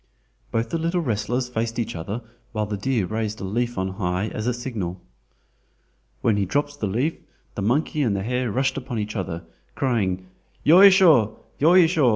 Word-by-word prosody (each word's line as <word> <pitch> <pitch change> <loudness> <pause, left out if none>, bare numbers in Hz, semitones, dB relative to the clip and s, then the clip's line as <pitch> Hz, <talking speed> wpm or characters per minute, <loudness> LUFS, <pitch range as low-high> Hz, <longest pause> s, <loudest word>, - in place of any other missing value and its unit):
Both 115 +1 -1
the 165 - -1
little 170 +2 0
wrestlers 120 -1 -1
faced 115 -1 -3
each 115 -5 -2
other 100 +9 -5 0.3
while 110 -1 -1
the 105 0 -3
deer 115 0 0
raised 110 +2 -3
a - - -6
leaf 120 +4 -2
on 95 0 -1
high 95 +1 -2
as 110 - -5
signal. 100 -8 -4 1.2
When 110 -3 +2
he 100 - +1
dropped 145 +7 -1
the 105 - -1
leaf 125 +11 -1 0.3
the - - -4
monkey 145 +8 +1
and 115 -7 +1
the 95 - -2
hare 125 +1 -1
rushed 135 +3 0
upon 130 -3 -4
each 110 +1 -3
other, 85 -4 -4 0.3
crying 95 -9 0 0.4
"Yoisho, 170 - +7 0.2
yoisho!" 165 -3 +5
115 Hz, 170 wpm, -23 LUFS, 100-135 Hz, 1.2 s, Yoisho